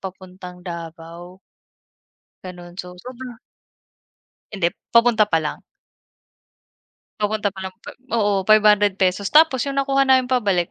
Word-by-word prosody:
papuntang 185 -1 -10
Davao. 170 +1 -9 1.1
Gano'n. 175 -1 -10
So, 180 0 -8
sobrang 250 +1 -10 1.1
Hindi, 185 -4 0 0.3
papunta 235 -2 +5
palang. 160 -2 -1 1.6
Papunta 210 0 -1
palang, 190 -1 -8
fa - - -9 0.2
oo, 205 -3 +1
₱500. 205 -3 +3
Tapos 300 -5 +4
yung 275 0 -4
nakuha 275 0 +2
na 260 -1 +5
pabalik 200 -9 0
195 Hz, 100 wpm, -21 LUFS, 180-235 Hz, 1.6 s, papunta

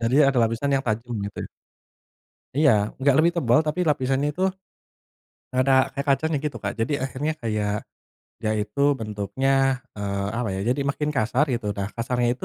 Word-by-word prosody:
Jadi 115 +3 +1
ada 135 -2 +2
lapisan 115 +5 -1
yang 135 - 0
tajam 115 +2 -2
gitu. 100 - -7 1.2
Iya, 150 -1 +5 0.3
enggak 135 0 +3
lebih 165 +2 +5
tebel 125 -7 +4
tapi 150 +4 -1
lapisannya 135 0 +1
itu 185 - -5 1.2
ada 130 +1 +3 0.2
kayak 140 +1 -4
kacanya 155 +3 +2
gitu, 140 -5 -3
Kak. - - -1
Jadi 115 +6 0
akhirnya 135 +3 -2
kayak 105 -3 -1 0.7
dia 110 - 0
itu 105 +5 -4 0.2
bentuknya, 105 +4 -2 0.5
eee, 100 -1 -2
apa 120 -2 -1
ya, 95 - -3
jadi 130 +3 0
makin 150 +1 -2
kasar 125 +4 +2
gitu, 115 -2 -4
nah 100 0 -1
kasarnya 120 +1 0
itu - - -5
125 Hz, 165 wpm, -24 LUFS, 110-140 Hz, 1.2 s, Iya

